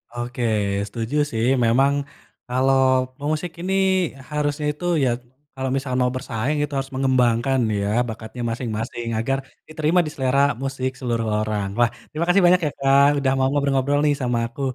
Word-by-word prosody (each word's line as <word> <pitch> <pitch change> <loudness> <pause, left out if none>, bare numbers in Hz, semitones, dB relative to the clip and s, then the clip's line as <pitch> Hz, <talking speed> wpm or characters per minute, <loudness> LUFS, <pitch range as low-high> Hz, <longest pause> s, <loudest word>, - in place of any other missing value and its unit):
Oke, 120 +1 -4 0.4
setuju 115 +5 -4 0.2
sih 115 0 0 0.2
memang 135 +5 +3 0.5
kalau 130 +2 +2 0.4
pemusik 155 +4 -2
ini 190 +2 -2 0.6
harusnya 150 0 -1
itu 165 +4 -8 0.2
ya, 130 - +3 0.5
kalau 130 0 -2
misal 135 -1 -3
mau 125 0 +2
bersaing 130 +3 -2
itu 145 -1 -4
harus 135 +1 -3
mengembangkan 130 -1 +2 0.2
ya 100 - -1 0.2
bakatnya 110 +2 -7
masing-masing 115 0 -4
agar 135 +4 0 0.3
diterima 155 +2 +1
di - - -3
selera 130 0 +1 0.2
musik 135 -1 -2
seluruh 115 -3 -1
orang. 105 -2 -1
Wah 120 -1 +4 0.2
terima 160 +2 -2
kasih 185 +1 +4
banyak 180 +1 +6
ya, 145 - -2
Kak, 135 +1 +5
udah 135 -1 +1
mau 130 0 +2
ngobrol-ngobrol 140 0 +1
nih 145 - +4
sama 120 -1 0
aku, 120 +4 -10
130 Hz, 160 wpm, -22 LUFS, 120-145 Hz, 0.6 s, banyak